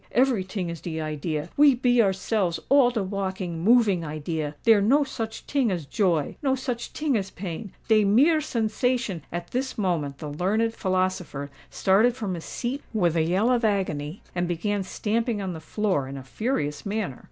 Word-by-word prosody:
Every 250 -6 +3
ting 185 -2 -4
is 170 - -7
de 160 -2 -4
idea—we 155 - +2
be 245 -1 +3
ourselves 190 -2 0
all 275 -3 +6
de 230 -4 -1
walking, 190 -3 -3
moving 215 -5 +4
idea: 155 0 -3
dere 225 -3 +6
no 270 +9 +4
such 225 -5 -5
ting 275 -5 +1
as 170 -5 -3
joy—no 190 - 0
such 250 -2 -4
ting 300 -4 0
as 195 -3 -1
pain—dey 200 +4 -1
mere 280 +11 +4
sensation—" 230 - -1
At 175 0 -5
this 260 +1 -2
moment 165 -9 -1
the 150 -1 -6
learned 215 +8 +1
philosopher 185 -8 -1 0.2
started 215 +6 +3
from 210 -7 -3
his 170 -2 -6
seat 255 +4 -3
with 175 -6 +2
a 165 - +3
yell 185 +9 +2
of 245 -1 +2
agony, 185 -6 -1
and 175 0 -1
began 200 +4 -1
stamping 225 +4 -1
on 190 -2 -3
the 160 - -7
floor 170 -4 -1
in 135 +1 -6
a 135 - -8
furious 150 - -2
manner. 200 - -3
195 Hz, 170 wpm, -25 LUFS, 170-230 Hz, 0.2 s, all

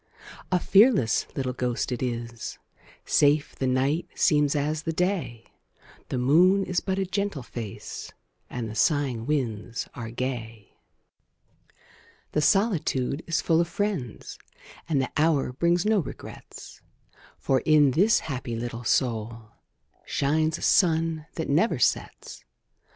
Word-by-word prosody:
A 180 - +3
fearless 195 - +4
little 130 -2 -2
ghost 125 0 -2
it 125 - -3
is; 120 -2 -4 0.5
Safe 145 0 +3
the 130 - -2
night 140 +7 0
seems 150 -2 +3
as 150 +2 -1
the 165 - -2
day; 165 - -2 0.6
The - - -2
moon 175 +10 +4
is 180 -2 -1
but 190 -1 -2
a 195 - 0
gentle 195 -6 -2
face, 115 -4 -7 0.4
And 120 -2 -4
the 110 - -7
sighing 125 -1 0
winds 120 -6 -2
are 115 -2 -6
gay. 115 -4 -5 1.6
The 150 - +1
solitude 160 - +1
is 165 - 0
full 165 0 +3
of 170 - -1
friends, 185 - -4 0.5
And 150 -4 +2
the 135 - -2
hour 150 -5 +2
brings 170 +6 +1
no 215 -1 +3
regrets; 165 - -9 0.6
For, 135 -1 +1
in 150 +1 +4
this 205 - +3
happy 130 -5 -4
little 120 +1 -5
soul, 115 -2 -1 0.5
Shines 155 +3 0
a - - -9
sun 165 -3 +2
that 160 - -3
never 170 +11 +2
sets. - - -1
145 Hz, 130 wpm, -26 LUFS, 125-170 Hz, 1.6 s, fearless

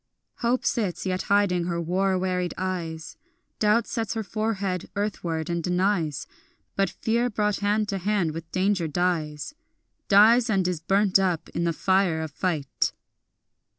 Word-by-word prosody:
Hope 245 +1 0
sits 200 -7 -1
yet 185 0 -1
hiding 200 -4 +3
her 170 -1 -2
war 185 +3 +1
wearied 180 -1 -1
eyes, 170 -4 -4 0.4
Doubt 215 +2 +3
sets 225 -4 -3
her 220 - -2
forehead 200 -4 -2
earthward 170 -6 -2
and 170 -1 -2
denies, 180 -4 0 0.5
But 195 -2 +2
fear 235 +5 0
brought 210 -2 0
hand 210 +1 +1
to 195 - -2
hand 195 -3 0
with 160 +1 -8
danger 185 -2 +1
dies, 155 - -1 0.5
Dies 225 +4 +6
and 190 -4 +2
is 180 -3 -1
burnt 195 +2 +3
up 180 -4 0
in 170 - -2
the 170 - +2
fire 185 -2 +2
of 160 -1 -5
fight. 150 -3 -1
185 Hz, 150 wpm, -25 LUFS, 170-205 Hz, 0.5 s, Dies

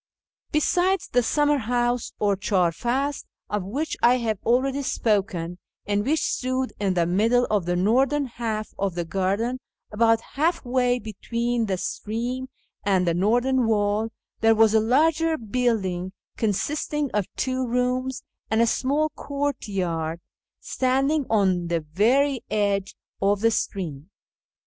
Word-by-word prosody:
Besides 360 +5 +1
the 245 - +3
summer 295 +4 +2
house, 240 +1 0
or 205 -1 +2
chdr 185 -3 +1
fad, 270 - -1 0.3
of 205 -2 -1
which 280 +12 -3
I 245 +1 +5
have 220 -4 -2
already 265 +4 +1
spoken, 190 -9 -1 0.3
and 205 0 0
which 310 +7 +1
stood 255 0 -1
in 195 -2 0
the 170 -1 +2
middle 225 +8 +3
of 200 -5 +1
the 175 - +1
northern 265 +10 +2
half 225 -3 -4
of 195 -3 -1
the 175 -1 -2
garden, 200 +8 -1 0.3
about 225 +1 +3
half 315 +2 0
way 250 0 +2
between 235 +1 -2
the 190 -2 -1
stream 240 +7 -3 0.3
and 190 -3 +2
the 170 - +2
northern 240 +9 +2
w^all, 215 -2 +1 0.3
there 225 0 +4
was 220 -1 +5
a 220 - +5
larger 315 +8 +2
building, 205 -7 -1 0.2
consisting 285 +6 -1
of 205 -3 0
two 260 -1 -1
rooms 250 +2 -1 0.3
and 220 - +1
a 230 - +5
small 285 +6 +1
courtyard, 195 - -3 0.4
standing 270 +3 0
on 190 -5 +2
the 170 -1 0
very 240 - +2
edge 200 -2 0 0.3
of 200 +1 +2
the 230 0 +4
stream. 175 -8 -3
230 Hz, 140 wpm, -24 LUFS, 200-260 Hz, 0.4 s, I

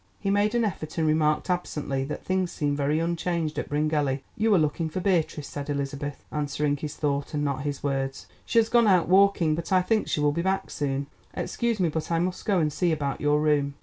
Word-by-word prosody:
He 195 - -1
made 205 +3 +2
an 235 -1 +3
effort, 160 -6 -4
and 160 - +2
remarked 155 -1 +2
absently 150 -7 -2
that 150 - -6
things 185 -1 0
seemed 145 -1 -1
very 145 +1 +1
unchanged 165 -1 -1
at - - -5
Bryngelly. 145 -2 0
"You 220 +1 +1
are - - +5
looking 160 +1 0
for 170 - -3
Beatrice," 170 -6 0
said 145 0 -6
Elizabeth, 140 0 -3
answering 145 -1 0
his 150 +1 -5
thought 145 0 -2
and 145 - 0
not 140 -1 -1
his 145 -1 -4
words. 135 -1 -2 0.2
"She - - -2
has 225 -1 +5
gone 235 -1 +4
out 180 -5 +4
walking, 185 -3 +4
but 165 +4 -4
I 185 -1 +4
think 220 +3 +1
she - - 0
will 150 0 +3
be 170 - -1
back 190 +2 -1
soon. 140 -1 -2 0.3
Excuse 235 -3 -1
me, 175 -3 +2
but 160 0 -3
I 165 - +2
must 180 +2 -2
go 200 -3 +2
and 155 -3 +1
see 175 +1 +1
about 145 -3 -2
your 150 0 +3
room." 145 -2 +1
155 Hz, 225 wpm, -26 LUFS, 145-180 Hz, 0.3 s, are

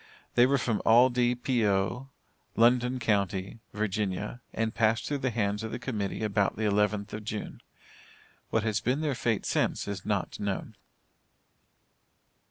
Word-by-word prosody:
They 120 +1 +6
were 140 +1 +3
from 115 -4 -1
Aldie 120 +1 +4
P.O., 120 0 +1 0.5
London 125 +2 +3
County, 100 -2 -1
Virginia, 105 +2 -2
and 110 0 -1
passed 115 0 +2
through 145 -1 -2
the 130 - 0
hands 105 -3 -1
of 110 - -4
the - - -3
Committee 110 -5 -3
about 100 -2 +1
the 110 - -3
11th 105 0 +1
of 105 0 -5
June. 105 0 -5 0.9
What 110 - +1
has 110 -3 0
been 130 +5 0
their 150 -3 0
fate 115 -4 -1
since - - 0
is 100 -2 -4
not 105 -3 -2
known. 100 -2 -3
110 Hz, 145 wpm, -29 LUFS, 105-120 Hz, 0.9 s, They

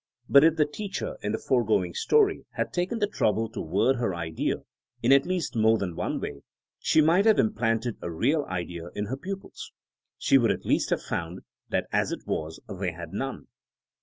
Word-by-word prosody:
But 140 +1 +7
if 160 0 +5
the 155 -2 +3
teacher 195 +6 -5
in 105 - -2
the 110 - 0
foregoing 110 -10 +1
story 420 -3 +2
had - - -2
taken 180 +6 -1
the 210 - +2
trouble 115 - 0
to - - -5
word 100 +11 +2
her 115 -7 -1
idea 80 -2 -2 0.4
in - - +4
at 140 +2 +5
least 180 -7 -2
more 110 0 +4
than 95 -5 -3
one - - -2
way, 70 -1 -6 0.4
she 155 - +4
might 170 +6 +4
have 220 - +6
implanted 115 +1 +1
a - - -4
real 140 - +1
idea 85 -2 -4
in 105 - -2
her 130 +6 -4
pupils. 195 +5 -7 0.5
She 135 - +4
would 115 -3 +3
at - - -1
least - - +1
have - - 0
found 85 +2 -4 0.3
that - - 0
as - - +1
it - - -5
was 80 +1 -3
they 95 -3 -3
had 85 0 -9
none. 135 +5 -4
115 Hz, 195 wpm, -27 LUFS, -, 0.5 s, But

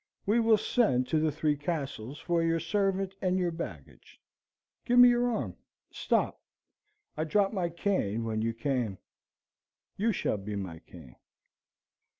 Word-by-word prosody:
We 215 +3 +3
will 225 -1 +5
send 200 - +1
to 155 - +2
the 155 0 +1
Three 150 0 0
Castles 145 -4 -4
for 170 0 0
your 165 0 +1
servant 195 +2 0
and 185 -1 +1
your 180 -2 0
baggage. 85 - -9 0.6
Give 245 - +1
me 245 0 +10
your 245 0 +2
arm. 235 - -3 0.4
Stop, - - 0 0.7
I 155 - -1
dropped 195 +6 +1
my 180 -4 -1
cane 165 - -1
when 110 -1 -2
you 115 +1 0
came. 115 -5 -1 1.0
You 225 +4 +2
shall 110 - -1
be 100 +1 -6
my 95 -5 -5
cane." 80 -8 -15
165 Hz, 150 wpm, -29 LUFS, -, 1.0 s, me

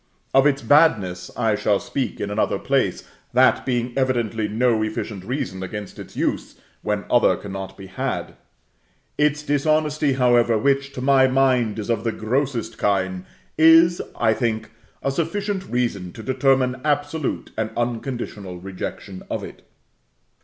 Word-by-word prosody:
Of 135 +2 +6
its 140 -1 0
badness, 100 - +3
I 110 -1 +2
shall 105 -1 +1
speak 125 +2 -3
in 100 - -3
another 105 - 0
place, - - 0 0.3
that 130 +2 +4
being 120 -1 -1
evidently 120 -5 0
no 115 +1 +1
efficient 110 -2 -4
reason 100 -4 -4
against 100 +1 -6
its - - -10
use - - -2 0.3
when 105 -1 -2
other 120 - +4
cannot 95 -1 -7
be 95 - -9
had. 95 0 -4 0.8
Its 150 0 +2
dishonesty, 150 0 +1
however, 120 -3 +3
which, 140 +4 +1
to 125 - -6
my 135 0 +5
mind, 130 -4 +2
is 110 +2 -2
of 115 -2 -1
the 115 - 0
grossest 115 0 -2
kind, 95 -2 0 0.3
is, 165 +2 +6 0.2
I 110 - +4
think, 110 -2 -2 0.3
a 135 - +1
sufficient 190 +6 -2
reason 110 -8 -2
to 110 - -9
determine 130 -1 +1
absolute 145 0 -1
and 110 0 -1
unconditional 120 -5 -3
rejection 95 +1 -7
of - - -3
it. - - -11
120 Hz, 145 wpm, -22 LUFS, 105-140 Hz, 0.8 s, Of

